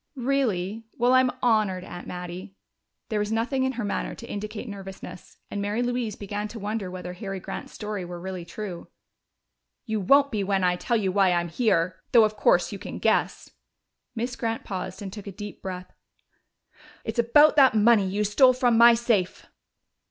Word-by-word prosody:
"Really? 230 -6 -1
Well, 245 +1 +3
I 255 - +7
am 255 -1 +2
honored, 215 -6 +2
Aunt 175 -1 -9
Mattie." 180 +2 -7 0.5
There 215 -2 0
was 210 +1 -2
nothing 245 +4 0
in 260 - -1
her 240 -2 -4
manner 205 - -3
to 235 - -10
indicate 210 +3 -6
nervousness, 195 -3 -9
and 205 - -3
Mary 210 +4 -1
Louise 245 -3 -2
began 205 +1 -4
to 225 - -9
wonder 210 -2 -3
whether 180 -1 -7
Harry 195 0 -6
Grant's - - -7
story 210 -3 -5
were 175 0 -7
really 185 0 -6
true. 175 +1 -7 1.0
"You 220 -2 -1
won't 280 +8 +4
be 210 -3 -1
when 195 -1 0
I 180 0 +3
tell 235 +6 0
you 195 -3 0
why 195 -1 +3
I'm 175 0 0
here! 170 -4 0
Though 230 -2 +8
of 215 0 +1
course 180 -3 +3
you 200 - -6
can - - -7
guess." - - 0 0.6
Miss 240 +2 -3
Grant 225 -1 -3
paused 190 0 -5
and 190 -1 -7
took 205 -2 -9
a - - -5
deep 205 +1 -9
breath. 185 -1 -7 1.1
"It's - - -3
about 295 +7 +5
that 265 -5 +6
money 215 -2 +5
you 205 +3 -1
stole 255 +6 +5
from 245 -2 +2
my 235 0 +8
safe!" 230 -6 0
210 Hz, 185 wpm, -25 LUFS, 185-235 Hz, 1.1 s, Though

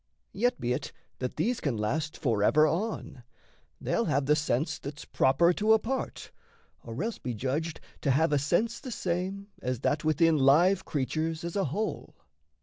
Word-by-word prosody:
Yet 245 +4 +1
be't 125 +3 -2 0.3
that 125 -1 -3
these 230 +10 0
can 135 -7 -1
last 145 +9 -2
forever 125 +3 +3
on: 170 - -2 0.6
They'll - - 0
have 140 0 +1
the 150 +2 +4
sense 150 +1 -1
that's 145 +1 -8
proper 170 +7 +3
to 215 +4 +3
a - - +7
part, 255 +5 -4 0.5
Or 115 - -5
else 225 0 -3
be 125 -2 -4
judged 145 +8 -2 0.2
to 140 - 0
have 150 +4 +3
a 145 - +3
sense 215 +11 0
the 260 - -8
same 190 0 -3
As 125 -1 -2
that 150 +2 0
within 155 +1 +3
live 170 +8 +4
creatures 155 +4 -2
as 170 0 -4
a 200 - +1
whole. 205 +10 -3
155 Hz, 165 wpm, -29 LUFS, 135-190 Hz, 0.6 s, a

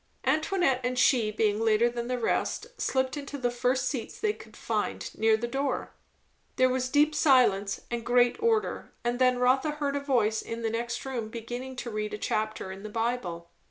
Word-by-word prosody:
Antoinette 310 -4 +2
and 250 0 -1
she, 245 -4 +4
being 215 0 +1
later 225 +1 +3
than 240 0 -3
the 250 0 -1
rest, 245 - -1 0.2
slipped 260 0 0
into 285 0 -6
the 245 -3 0
first 250 +1 0
seats 255 -5 -4
they 425 -1 +1
could - - -14
find, - - -3
near 220 0 +3
the 240 +2 -3
door. 270 +1 -2 0.6
There 255 0 +4
was 255 0 -1
deep 295 +3 +3
silence 240 -10 +3
and 235 -1 -2
great 245 - +3
order, 445 -1 0
and 240 +1 -1
then 255 -1 +4
Rotha 260 +4 +2
heard 285 -1 -1
a - - +1
voice 235 -6 +1
in 230 0 -6
the 225 - 0
next 235 +2 -3
room 240 -5 -3
beginning 245 +3 -6
to 250 -2 -5
read 210 0 -3
a - - -6
chapter 215 -2 -2
in 190 +1 -8
the 215 - -7
Bible. 210 -7 -3
245 Hz, 195 wpm, -28 LUFS, 225-265 Hz, 0.6 s, she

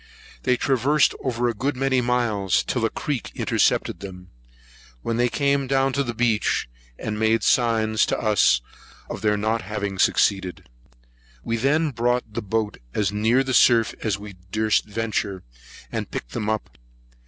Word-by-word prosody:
They 125 -1 +2
traversed 135 +3 +2
over 120 -2 0
a 120 - 0
good 130 +7 -2
many 135 -1 +2
miles, 115 -6 +1
till 125 - -2
a - - +1
creek 140 0 -4
intercepted - - +1
them; 90 -2 -10 0.7
when 115 0 -1
they 120 0 +2
came 140 0 +1
down 135 0 +2
to 140 - +1
the 120 -2 -4
beach, 115 - +1 0.3
and 105 0 -4
made 110 0 +2
signs 110 -3 +2
to - - 0
us 105 - +3 0.5
of - - -6
their 105 -1 +2
not 110 +2 0
having 100 -1 -4
succeeded. 95 -3 +1 0.8
We 115 - -1
then 145 +6 +1
brought 120 -2 -1
the - - -2
boat 105 +1 -2 0.2
as 105 -1 +1
near 110 +5 +2
the 130 -1 -2
surf 115 -2 +5
as 105 -4 0
we 100 -2 -10
durst 110 0 +1
venture, 105 -3 -3 0.5
and - - -3
picked - - -6
them 105 - -3
up. 105 - -4
115 Hz, 160 wpm, -23 LUFS, 105-125 Hz, 0.8 s, surf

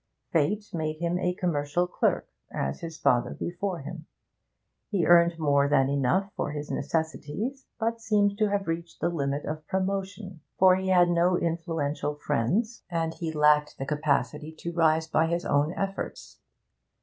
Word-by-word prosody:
Fate 200 +7 +1
made 155 -2 -2
him 170 +2 -1
a 180 -1 0
commercial 170 -1 0
clerk 180 - 0 0.2
as 70 0 -2
his 165 -1 -7
father 120 -1 +2
before 175 0 -3
him; 160 +3 -8 0.8
he 195 -5 +1
earned 170 -1 +5
more 140 -3 +2
than 135 -2 +3
enough 140 +9 +1
for 145 - -2
his 150 0 -5
necessities, 165 - -3
but 230 0 -1
seemed 205 -2 +2
to 215 -1 +3
have 200 -2 -1
reached 165 +1 -4
the - - +1
limit 140 -3 -2
of 155 0 -5
promotion, 190 -2 -3 0.2
for 185 -1 +6
he 190 0 -3
had 180 -2 +5
no 175 +1 +3
influential 165 -4 -2
friends, 150 - -1
and 165 -2 -1
he 165 -1 -4
lacked 150 -1 +3
the 135 - -4
capacity 150 0 -1
to 170 +2 -6
rise 160 -1 +3
by 160 0 +2
his 170 +1 -1
own 145 +2 +2
efforts. 195 0 -5
165 Hz, 160 wpm, -27 LUFS, 150-185 Hz, 0.8 s, for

